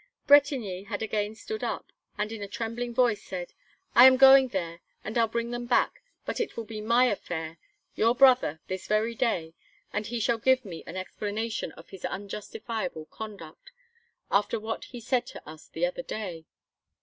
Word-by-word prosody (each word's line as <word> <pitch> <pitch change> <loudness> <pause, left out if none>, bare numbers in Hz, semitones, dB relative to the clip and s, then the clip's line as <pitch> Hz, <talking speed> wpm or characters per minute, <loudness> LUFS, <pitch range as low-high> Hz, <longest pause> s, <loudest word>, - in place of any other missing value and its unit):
Bretigny 260 -10 +4
had 205 0 -3
again 215 0 -2
stood 435 - -6
up, - - -4 0.3
and 210 +1 -2
in 225 -2 -6
a 200 - -4
trembling 230 +3 -4
voice, 235 -3 +2
said: 180 -2 -6 0.4
"I 245 - +9
am 260 0 +6
going 270 0 +8
there 170 -6 -4 0.2
and 215 - -5
I'll 230 -1 +4
bring 235 +1 -2
them 240 0 -4
back, 245 - +2 0.2
but - - -3
it 465 - -3
will 230 - -2
be 215 -1 -6
my 235 +4 +4
affair 165 -7 -3 0.3
your 230 +2 +2
brother 250 - +5
this 185 0 -5
very 215 +2 +1
day 195 -9 -1 0.4
and 210 0 -2
he 240 0 -3
shall 230 +1 +1
give 260 +1 +3
me 170 -5 -8
an 185 - -6
explanation 215 +4 -3
of - - -15
his 190 -2 -11
unjustifiable 210 -1 -5
conduct, 200 -8 -9 0.6
after 205 +2 +2
what 220 +1 -4
he 245 - -9
said 245 +1 0
to - - -11
us 155 0 -11
the - - -1
other - - -3
day." 185 - -6
220 Hz, 180 wpm, -28 LUFS, 195-245 Hz, 0.6 s, I